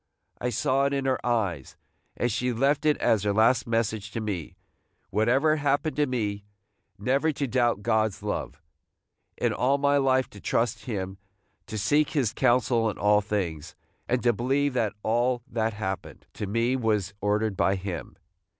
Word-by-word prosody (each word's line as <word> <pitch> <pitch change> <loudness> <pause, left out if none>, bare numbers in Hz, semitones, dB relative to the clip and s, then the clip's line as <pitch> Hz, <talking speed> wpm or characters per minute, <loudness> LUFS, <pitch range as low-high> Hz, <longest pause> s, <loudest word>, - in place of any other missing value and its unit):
I 125 - -1
saw 130 +4 +1
it 140 - 0
in 135 -1 -1
her 130 -1 0
eyes, 100 - -1 0.4
and 120 - 0
she 125 +4 0
left 140 +5 +1
it 150 - +3
as 110 - +2
her 100 0 0
last 115 +4 +3
message 110 -2 -1
to - - -2
me, 100 -7 -4 0.6
whatever 135 +8 +3
happened 145 +1 0
to 150 -1 +2
me, 105 -5 -2 0.5
never 135 +9 +1
to 140 0 -2
doubt 120 -5 +1
God's 110 -1 +1
love, 70 - -4 0.4
– - - -52
in - - +1
all 135 +3 +2
my 140 0 +3
life 130 -1 +2
to 100 - -12
trust 115 +1 -1
him, 95 -5 -4 0.5
to 110 - -5
seek 145 +8 +2
his 130 -8 +1
counsel 120 -2 +2
in 105 - -5
all 105 0 +4
things, 85 -7 -3 0.3
and 125 0 0
to 120 -1 +4
believe 135 +5 0
that 115 -5 0
all 120 +2 +1
that 115 -1 -1
happened 95 -2 -5
to 105 - -5
me 115 +5 +1
was 105 -6 0
ordered 105 +1 +1
by 95 +1 +2
him. 90 -7 -6
115 Hz, 170 wpm, -26 LUFS, 105-130 Hz, 0.6 s, all